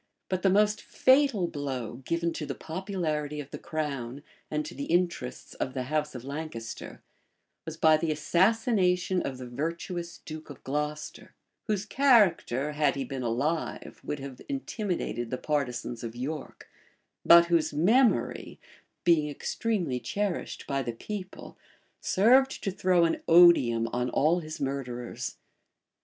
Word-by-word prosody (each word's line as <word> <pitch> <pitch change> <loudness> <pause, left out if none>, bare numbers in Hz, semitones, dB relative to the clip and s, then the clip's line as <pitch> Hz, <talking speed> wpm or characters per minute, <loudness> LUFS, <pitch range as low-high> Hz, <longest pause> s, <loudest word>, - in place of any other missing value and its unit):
But 185 -1 -1
the 195 - +4
most 210 +2 +3
fatal 260 -7 +3
blow 135 -7 -4
given 170 0 0
to 150 - -5
the - - -4
popularity 160 -4 -3
of 145 -2 -8
the - - -6
crown 140 -4 -4 0.3
and 150 0 -2
to - - -7
the 140 - -5
interests 170 -7 -1
of 130 - -4
the 130 - -1
house 150 -2 0
of 125 - -7
Lancaster, 140 -5 -7 0.6
was 160 0 -6
by 160 -1 +5
the 160 0 -1
assassination 180 - +2
of 130 - -4
the 130 - -7
virtuous 170 +6 -4
duke 155 0 -8
of 145 - -11
Glocester; 150 +2 -4 0.3
whose 210 -2 -1
character, 200 - +3
had 150 -2 +1
he 135 - -2
been 130 +1 -5
alive, 135 +8 -2
would 150 - -3
have 135 -2 -8
intimidated 195 - -3
the 130 - -2
partisans 125 -5 -2
of 115 0 -6
York; 140 +4 -6 0.6
but 170 0 +8
whose 165 -2 +2
memory, 220 - +2 0.4
being 160 -4 +3
extremely 175 - -2
cherished 195 - -3
by 140 -1 -1
the 120 -2 -3
people, 190 - -8 0.4
served 260 +7 +3
to 195 - 0
throw 180 -2 +3
an 165 - -1
odium 165 -10 +6
on 125 +1 -1
all 160 +5 +2
his 155 -2 -7
murderers. 125 -3 -4
155 Hz, 145 wpm, -28 LUFS, 135-180 Hz, 0.6 s, but